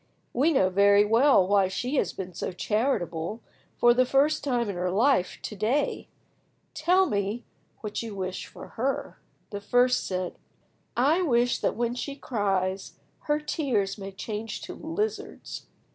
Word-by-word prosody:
We 285 +7 +3
know 190 -11 +3
very 200 +2 +5
well 225 -2 +5
why 200 -1 +4
she 250 +9 -2
has - - +1
been 185 -1 -7
so - - -4
charitable, 210 -3 -1 0.4
for 240 0 +6
the 255 +1 +4
first 275 +4 +2
time 245 -5 0
in 200 - -3
her 180 +1 -1
life, 210 0 +2
to 215 - -5
day. 225 +9 0 0.7
Tell 360 +5 +3
me 205 - -2
then - - -40
what 210 -1 -4
you 225 -3 -6
wish 185 -1 -4
for - - -11
her." 265 +4 -3 0.3
The 205 -1 -5
first 245 +4 +2
said— 185 -1 -3 0.6
"I 295 +9 +3
wish 245 -7 +2
that - - 0
when 235 +1 -1
she 275 +3 -5
cries 195 -7 -1 0.3
her 295 0 +1
tears 240 - -1
may 195 0 -6
change 210 +2 -5
to - - -6
lizards." 360 +8 -4
225 Hz, 160 wpm, -27 LUFS, 195-270 Hz, 0.7 s, for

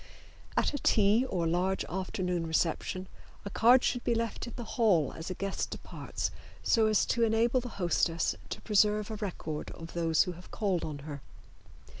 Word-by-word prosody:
At - - +2
a 285 - -2
tea 220 +3 +4
or 175 -3 0
large 180 +3 0
afternoon 180 -2 -2
reception 170 +3 -1 0.4
a 200 - -5
card 245 +5 +6
should 245 - 0
be 235 - +1
left 230 +1 -2
in 235 - -8
the 240 - -5
hall 210 - +2
as 165 +2 -6
a 185 - -3
guest 195 +1 -2
departs, - - -4 0.3
so 220 -1 +4
as 215 -2 +3
to 235 - 0
enable 230 +2 +3
the 245 - -6
hostess 170 -2 +1 0.2
to - - -5
preserve 210 0 +2
a - - -3
record 170 -7 -4
of 165 0 -9
those 165 -2 +3
who 180 - -4
have 180 +1 -12
called 195 -6 -1
on 150 -2 -4
her. 145 -2 -6
195 Hz, 180 wpm, -30 LUFS, 170-225 Hz, 0.4 s, card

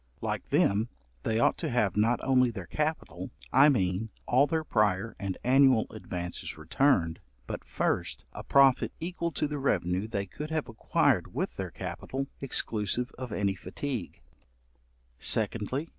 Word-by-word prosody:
Like - - -3
them, 105 +4 +3 0.3
they 110 - 0
ought 115 - +3
to - - -2
have 105 -6 +1
not 115 +3 +3
only 130 -2 +4
their 100 -6 -6
capital, 150 - -3 0.2
I 135 +3 +8
mean, 95 -4 +1 0.2
all 130 +4 +4
their 160 +2 0
prior 105 -4 +1
and 100 -2 -3
annual 130 -2 +5
advances 90 -6 -6
returned, 80 - +2 0.3
but, - - -5
1st, - - -1
a - - -7
profit 135 -2 +4
equal 170 0 -3
to 150 - 0
the 145 0 -4
revenue 95 -6 0
they 100 -3 -2
could 150 +11 -7
have 160 -2 -1
acquired 115 -2 +1
with - - -2
their - - -4
capital, 135 +1 -4 0.2
exclusive 120 -2 0
of 130 -3 -5
any 100 -1 +1
fatigue; 100 +4 -5 1.0
2ndly. 115 +8 0
115 Hz, 145 wpm, -29 LUFS, 100-135 Hz, 1.0 s, I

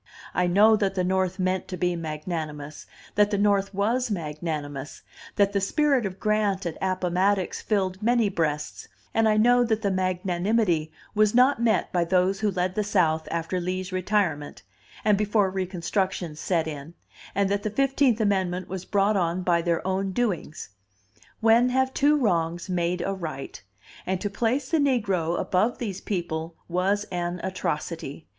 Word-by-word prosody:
I 180 - +2
know 210 +5 +6
that 200 -2 0
the 185 - +1
North 185 0 0
meant 185 -1 -1
to 185 - -5
be 180 -1 0
magnanimous, 155 -2 -5 0.3
that 205 0 +4
the 205 - 0
North 200 -1 +2
was 230 +6 0
magnanimous, 150 -5 -4 0.3
that 200 0 +3
the 200 - +1
spirit 275 +2 +2
of 190 0 -9
Grant 210 -3 0
at 170 - -3
Appomattox 185 +1 0
filled 190 -2 -1
many 235 0 +3
breasts; 155 -5 -2 0.3
and 225 0 +3
I 215 - +3
know 245 +3 +5
that 225 -2 0
the 200 - +1
magnanimity 185 -1 0 0.2
was 215 +1 +3
not 250 0 +4
met 230 -2 +1
by 175 -1 +2
those 185 +2 +1
who 215 - +1
led 180 -1 -1
the 210 - 0
South 165 -6 +1
after 170 +2 -2
Lee's 185 +1 -3
retirement, 185 -6 -1 0.4
and 210 -2 +4
before 210 -2 +2
reconstruction 185 -2 -2
set 165 +1 0
in, 155 +2 -7 0.4
and 200 0 +2
that 200 0 0
the 215 - -2
Fifteenth 270 0 +2
Amendment 190 -4 0
was 190 -1 -6
brought 205 +1 +2
on 180 -1 0
by 170 -1 +2
their 170 0 -1
own 190 0 -1
doings: 190 - -2 0.7
when 230 +2 +5
have 260 +1 +1
two 295 +1 +3
wrongs 170 - 0
made 175 0 0
a 195 - -1
right? 155 -8 -6 0.5
And 190 0 0
to 205 0 -3
place 240 +6 0
the 325 - +2
negro 195 - +1
above 210 +6 +1
these 200 -5 -4
people 165 -4 -3
was 190 +4 +1
an 175 0 -2
atrocity. 165 -5 -4
190 Hz, 165 wpm, -25 LUFS, 175-210 Hz, 0.7 s, know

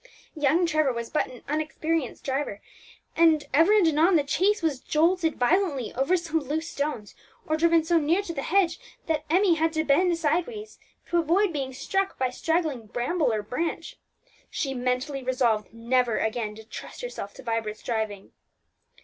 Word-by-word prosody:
Young 310 +4 +2
Trevor 310 -4 +2
was 235 -1 -5
but 305 - +1
an 250 - -13
inexperienced 310 -1 -2
driver, 265 -6 -2 0.6
and 320 -2 +4
ever 330 +7 +5
and 420 -5 +5
anon 325 +4 +4
the 295 -3 +3
chaise 385 +6 +1
was 300 -5 0
jolted 325 +3 +1
violently 280 - +1
over 275 +9 +2
some 325 -2 -1
loose 310 +3 -3
stones, 280 -8 -3 0.3
or 310 - 0
driven 330 0 +3
so 335 +1 +3
near 330 +6 +1
to 340 - -5
the 275 - -3
hedge 345 +1 +1 0.3
that 310 -2 -1
Emmie 365 +2 +4
had 325 0 +1
to 315 -1 0
bend 335 +4 +3
sideways 355 +8 -2 0.3
to 345 - +3
avoid 345 +4 +2
being 270 -3 -3
struck 390 +9 -2
by 255 -1 0
straggling 315 -6 -1
bramble 250 - 0
or 215 -1 -1
branch. 250 +10 -4 0.5
She 275 -4 -2
mentally 255 +2 -2
resolved 245 -4 0
never 235 +1 +1
again 220 -1 -2
to 220 - -11
trust 220 - -9
herself 345 - -6
to - - -11
Vibert's 225 -2 -3
driving. 220 -4 -3
305 Hz, 165 wpm, -26 LUFS, 250-335 Hz, 0.6 s, ever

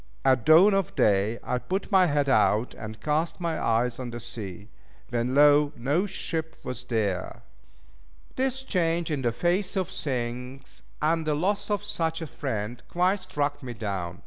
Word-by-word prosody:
At 130 -4 +3
dawn 175 +6 +8
of 195 -4 0
day 105 +2 +2
I 125 - -1
put 190 +9 -3
my 190 -2 +5
head 145 -2 +1
out, 120 -3 +3
and 110 -1 -8
cast 155 +2 -1
my 170 -2 -2
eyes 115 +2 +1
on 125 -2 -4
the 120 0 -6
sea. 105 -4 -7 0.4
When 120 +2 -1
lo! 145 0 +5
no 145 +11 +1
ship 160 -4 -4
was 125 0 -6
there! 105 -7 -2 0.9
This 265 0 -1
change 170 -7 0
in 145 -3 -1
the 120 -2 +1
face 175 - 0
of 190 -3 0
things, 125 0 -5 0.2
and 160 +1 +1
the 150 - +2
loss 195 +8 0
of 205 0 0
such 165 -6 -2
a 165 - -4
friend, 120 -6 -4
quite 185 +3 +2
struck 145 -6 -2
me 125 -3 -6
down. 95 -6 -4
145 Hz, 170 wpm, -27 LUFS, 120-170 Hz, 0.9 s, dawn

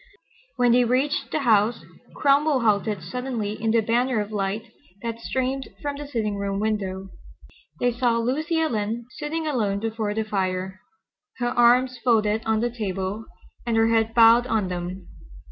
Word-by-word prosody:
When 245 -1 +3
they 245 +1 +5
reached 260 +5 0
the 310 - 0
house 220 -2 +2 0.3
Cromwell 285 -1 +3
halted 210 -3 +1
suddenly 225 +1 -4
in 225 - 0
the 225 0 +3
banner 235 +2 +1
of 210 0 -4
light 205 +1 -3 0.3
that 230 -1 -4
streamed 260 +2 -2
from 285 -1 -3
the 290 0 -7
sitting 215 -6 -2
room 200 0 -2
window. 195 -3 -2 0.7
They 245 - +2
saw 240 -1 +1
Lucy 305 +8 0
Ellen 230 -6 -1
sitting 315 +2 -3
alone 215 -9 0
before 220 -1 -2
the 220 - 0
fire, 190 -2 -2 0.6
her 240 -1 0
arms 245 +1 +3
folded 220 -3 +2
on 220 0 +2
the 240 0 0
table, 195 0 -3 0.4
and 235 -2 0
her 225 0 +4
head 225 0 +1
bowed 230 +1 +6
on 210 -6 0
them. 180 +1 -5
225 Hz, 160 wpm, -24 LUFS, 210-250 Hz, 0.7 s, bowed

